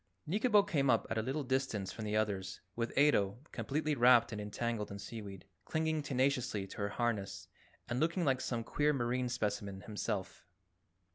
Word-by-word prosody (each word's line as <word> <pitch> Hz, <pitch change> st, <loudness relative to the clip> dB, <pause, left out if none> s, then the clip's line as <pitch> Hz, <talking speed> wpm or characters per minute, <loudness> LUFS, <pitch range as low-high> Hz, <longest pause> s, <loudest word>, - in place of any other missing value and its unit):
Nikobo 210 Hz, +4 st, +4 dB
came 140 Hz, -8 st, +2 dB
up -, -, +4 dB
at 115 Hz, -, +1 dB
a -, -, +2 dB
little 135 Hz, +6 st, -2 dB
distance 130 Hz, -7 st, -1 dB
from 110 Hz, +1 st, -6 dB
the 105 Hz, 0 st, 0 dB
others, 95 Hz, -3 st, -1 dB, 0.2 s
with 115 Hz, 0 st, -1 dB
Ato, 105 Hz, -8 st, +4 dB
completely 155 Hz, +2 st, -1 dB
wrapped 120 Hz, -3 st, +6 dB
and 105 Hz, -1 st, -4 dB
entangled 105 Hz, +1 st, -2 dB
in 100 Hz, -, -6 dB
seaweed, 100 Hz, -2 st, -8 dB, 0.2 s
clinging 160 Hz, -1 st, 0 dB
tenaciously 130 Hz, -7 st, 0 dB
to 95 Hz, -, -11 dB
her 100 Hz, 0 st, -1 dB
harness 100 Hz, -4 st, -2 dB, 0.4 s
and 120 Hz, -, -1 dB
looking 170 Hz, +3 st, +1 dB
like 130 Hz, -2 st, +2 dB
some 115 Hz, -2 st, -2 dB
queer 150 Hz, +5 st, +1 dB
marine 125 Hz, -1 st, 0 dB
specimen 105 Hz, -4 st, -2 dB
himself. 105 Hz, -1 st, -4 dB
120 Hz, 165 wpm, -34 LUFS, 105-140 Hz, 0.4 s, wrapped